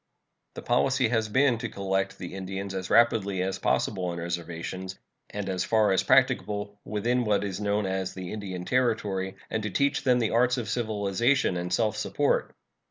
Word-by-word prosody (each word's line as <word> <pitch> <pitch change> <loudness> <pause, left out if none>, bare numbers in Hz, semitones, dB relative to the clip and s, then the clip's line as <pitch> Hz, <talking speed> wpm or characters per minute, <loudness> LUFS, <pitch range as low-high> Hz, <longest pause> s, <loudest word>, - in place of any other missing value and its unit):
The - - -7
policy 130 0 +2
has 110 -2 0
been 130 0 +3
to 120 -1 -3
collect 95 0 -2
the 90 -2 -7
Indians 95 +1 -5
as 95 -1 -4
rapidly 105 -5 +3
as 95 0 -2
possible 95 -1 0
on 85 -1 -3
reservations, 85 +2 -5 0.3
and 105 -1 -5
as 95 -2 -1
far 110 -2 +3
as 95 - +3
practicable 105 -6 +2
within 120 +4 0
what 105 -2 +1
is 100 0 -4
known 105 0 0
as 95 -1 -2
the 90 0 -6
Indian 95 -4 -5
Territory, 105 -6 0 0.2
and 110 - -1
to 105 - -3
teach 140 +8 +1
them 125 -2 +4
the 115 -3 0
arts 125 +2 +3
of 115 -5 -3
civilization 110 +1 +1
and 90 0 -3
self 110 +2 +1
support. - - 0
100 Hz, 175 wpm, -27 LUFS, 95-115 Hz, 0.3 s, them